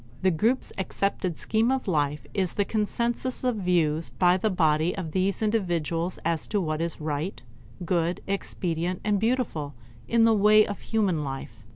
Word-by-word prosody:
The 190 - +4
group's 225 +10 0
accepted 190 -3 -1
scheme 225 +2 +1
of 265 -3 -1
life 150 -4 0
is 190 -4 -1
the 205 - +1
consensus 235 +5 -1
of 250 -3 +1
views 165 -4 +1
held - - -23
by 180 0 +4
the 215 +3 0
body 160 -2 +2
of 170 -5 -4
these 190 +4 0
individuals 175 -5 0
as 165 -2 0
to 210 - 0
what 155 -3 -2
is 170 -1 -2
right, 155 +4 -3 0.5
good, 170 0 0
expedient, 180 -3 -2
and 205 -1 +1
beautiful 220 - -1 0.3
in 230 -1 +3
the 225 - +5
way 215 +1 +6
of 205 - -5
human 195 -9 0
life. 135 -3 -6
185 Hz, 170 wpm, -26 LUFS, 165-215 Hz, 0.5 s, way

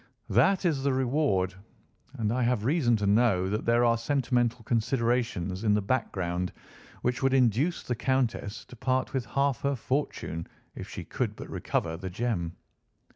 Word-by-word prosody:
"That 195 -1 +4
is 155 -6 +2
the 140 0 +1
reward, 130 - +1 0.6
and 110 -4 -1
I 125 - 0
have 120 -3 +1
reason 135 -4 +3
to 105 -2 -1
know 100 -3 +3
that 105 - -2
there 120 +1 +4
are 115 -1 +3
sentimental 120 -2 0
considerations 115 -5 0
in 105 -2 +4
the 105 - +1
background 90 -6 -1 0.5
which 125 0 0
would 135 0 +3
induce 130 - +2
the 125 - -2
Countess 120 -3 -1
to - - -13
part 130 +2 0
with 130 -5 -2
half 140 +2 0
her 140 0 +1
fortune 125 - -2 0.3
if - - -8
she - - -6
could - - -2
but - - -8
recover 80 0 -1
the 95 +2 -5
gem." 90 -5 -2
120 Hz, 165 wpm, -28 LUFS, 105-130 Hz, 0.6 s, That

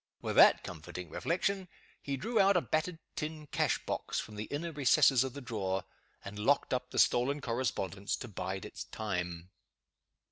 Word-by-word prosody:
With - - -3
that - - +8
comforting 90 +2 -7
reflection, 190 +2 -1 0.3
he 140 -1 -3
drew 225 - 0
out 195 -1 +5
a - - +3
battered 160 +2 -1 0.2
tin 155 0 -4
cash - - +1
box - - -2
from 105 - -7
the 105 +1 -4
inner 160 +6 -4
recesses 135 -3 +5
of 130 -2 -4
the 140 - -7
drawer, 100 -6 -2 0.4
and 100 +1 -7
locked 135 +7 +2
up 125 0 -1
the - - -7
stolen 135 +4 +3
correspondence 115 -6 -2
to 130 - -7
bide 95 -2 -4
its - - -7
time. 90 -4 -4
125 Hz, 170 wpm, -32 LUFS, 100-150 Hz, 0.4 s, that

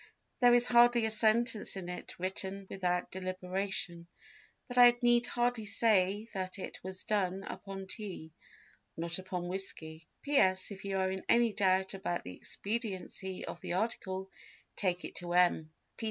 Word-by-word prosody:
There 245 -2 +6
is 240 0 +5
hardly 240 -1 +5
a 220 - 0
sentence 220 0 +2
in 190 -2 -6
it 180 0 -7
written 190 +1 -2
without 180 -2 -1
deliberation; 185 -1 -2 0.6
but 245 - -7
I 245 -1 +8
need 240 0 +4
hardly 240 -2 0
say 210 -1 +2
that 185 0 -3
it 190 - -7
was 190 0 -5
done 195 -2 0
upon 195 -1 -7
tea, 190 -5 -5 0.7
not 170 +2 -1
upon 185 -1 -4
whiskey... 165 -4 -3 0.2
"P.S. 190 -10 +3
If 195 0 -9
you 195 -1 -1
are 190 0 +1
in 190 0 -4
any 235 -2 +4
doubt 190 -1 +2
about 180 -2 -3
the 90 - -8
expediency 200 -3 -4
of 170 - -7
the - - -3
article 190 -2 -2 0.4
take 180 -3 -1
it - - -7
to 175 -1 -4
M. 175 -3 +3
190 Hz, 155 wpm, -32 LUFS, 185-220 Hz, 0.7 s, I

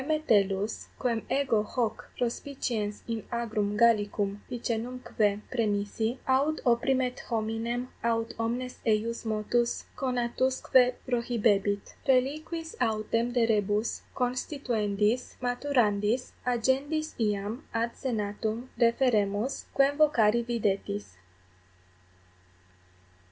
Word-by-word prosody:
Metellus, 210 -10 +1
quem 235 -3 0
ego 265 -6 +2
hoc 225 +1 -2
prospiciens 235 -4 -2
in 230 -2 -3
agrum 215 -3 -1
Gallicum 205 -3 +2
Picenumque 230 -3 -1
praemisi, 220 0 0
aut 280 +4 +2
opprimet 250 +1 +2
hominem 230 +2 -1 0.2
aut 230 0 0
omnes 245 +3 -2
eius 225 +1 0
motus 220 +2 0
conatusque 255 0 +2
prohibebit. 215 -5 +1
Reliquis 310 +5 0
autem 230 +1 +1
de 240 -1 +3
rebus 210 0 +1
constituendis, 245 -4 0
maturandis, 245 -3 +1 0.2
agendis 270 +6 +1
iam 210 +4 -1
ad 230 +1 0
senatum 220 0 -2
referemus, 230 -2 +2
quem 275 +1 +4
vocari 235 -7 +4
videtis. 195 - -2
235 Hz, 85 wpm, -29 LUFS, 210-255 Hz, 0.2 s, quem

